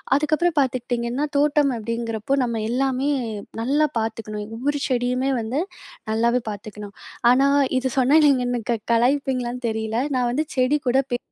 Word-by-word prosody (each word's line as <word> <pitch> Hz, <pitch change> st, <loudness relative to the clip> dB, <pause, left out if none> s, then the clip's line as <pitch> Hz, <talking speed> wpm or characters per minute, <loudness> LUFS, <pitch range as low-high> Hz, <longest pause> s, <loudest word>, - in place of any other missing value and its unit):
அதுக்கப்புறம் 310 Hz, +3 st, +1 dB
பார்த்துக்கிட்டிங்கன்னா, 245 Hz, +1 st, -1 dB
தோட்டம் 290 Hz, -1 st, +3 dB
அப்படிங்கிறப்போ, 230 Hz, +2 st, -2 dB
நம்ம 230 Hz, -2 st, -2 dB
எல்லாமே 265 Hz, +2 st, 0 dB, 0.5 s
நல்லா 290 Hz, +5 st, +2 dB
பார்த்துக்கணும். 215 Hz, -1 st, -4 dB
ஒவ்வொரு 285 Hz, +3 st, -1 dB
செடியுமே 250 Hz, +1 st, 0 dB
வந்து, 250 Hz, +8 st, -2 dB, 0.5 s
நல்லாவே 235 Hz, +2 st, +2 dB
பார்த்துக்கணும். 210 Hz, 0 st, -8 dB, 0.4 s
ஆனா 270 Hz, +2 st, +4 dB, 0.3 s
இது 260 Hz, 0 st, -1 dB
சொன்னா, 270 Hz, +5 st, +5 dB
நீங்க 260 Hz, -3 st, +3 dB
எனக்கு 240 Hz, -2 st, -3 dB
க 220 Hz, -, -4 dB
கலாய்ப்பீங்களான்னு 250 Hz, 0 st, 0 dB
தெரியல. 220 Hz, +1 st, -2 dB, 0.2 s
நான் 245 Hz, -1 st, +1 dB
வந்து 305 Hz, +5 st, 0 dB
செடி 255 Hz, +4 st, +3 dB
கூட 260 Hz, -, +3 dB
பே.. 245 Hz, -, +1 dB
250 Hz, 140 wpm, -22 LUFS, 230-275 Hz, 0.5 s, சொன்னா